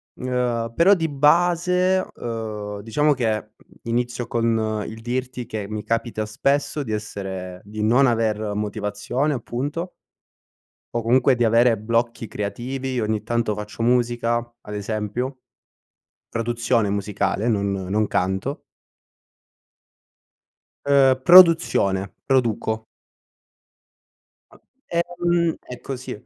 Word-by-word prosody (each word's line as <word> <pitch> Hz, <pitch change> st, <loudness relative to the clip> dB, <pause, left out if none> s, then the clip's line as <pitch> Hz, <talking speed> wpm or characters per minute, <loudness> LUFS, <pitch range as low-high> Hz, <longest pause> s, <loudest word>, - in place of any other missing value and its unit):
ehm, 125 Hz, -2 st, -2 dB
però 180 Hz, +4 st, +6 dB
di 165 Hz, -4 st, +1 dB
base, 175 Hz, +5 st, +3 dB
ehm, 105 Hz, -3 st, -5 dB
diciamo 145 Hz, +8 st, +2 dB
che, 125 Hz, -5 st, 0 dB, 0.3 s
mhmm, -, -, -24 dB
inizio 120 Hz, 0 st, -2 dB
con 110 Hz, -2 st, 0 dB
il 110 Hz, -, -8 dB
dirti 125 Hz, +1 st, -3 dB
che 110 Hz, -3 st, -5 dB
mi 105 Hz, -1 st, -5 dB
capita 115 Hz, -1 st, -1 dB
spesso 140 Hz, +7 st, 0 dB
di 115 Hz, -, -6 dB
essere 95 Hz, -4 st, -5 dB
di 105 Hz, +1 st, -7 dB
non 120 Hz, +6 st, +4 dB
aver 110 Hz, -3 st, 0 dB
motivazione, 105 Hz, +7 st, -2 dB
appunto 145 Hz, +9 st, -4 dB, 1.0 s
o 120 Hz, -, 0 dB
comunque 125 Hz, +3 st, +4 dB
di 120 Hz, -1 st, +1 dB
avere 115 Hz, +1 st, +4 dB
blocchi 115 Hz, +2 st, -1 dB
creativi. 125 Hz, +5 st, -4 dB
Ogni 110 Hz, -1 st, -1 dB
tanto 120 Hz, -2 st, -1 dB
faccio 105 Hz, +2 st, -6 dB
musica, 120 Hz, -1 st, +2 dB, 0.3 s
ad 105 Hz, -, -8 dB
esempio. 110 Hz, +5 st, -3 dB, 0.9 s
Produzione 115 Hz, -1 st, 0 dB
musicale, 100 Hz, +2 st, -1 dB
non 100 Hz, -3 st, +1 dB
non 100 Hz, +2 st, -1 dB
canto. 95 Hz, +10 st, -1 dB, 2.3 s
Ehm, 135 Hz, -2 st, +4 dB
produzione. 160 Hz, -, +6 dB
Produco. 115 Hz, -4 st, 0 dB, 1.7 s
A -, -, -19 dB, 0.3 s
ehm, 175 Hz, -1 st, 0 dB
è 125 Hz, -, -10 dB
così. 130 Hz, -1 st, -6 dB
115 Hz, 105 wpm, -23 LUFS, 105-130 Hz, 2.3 s, però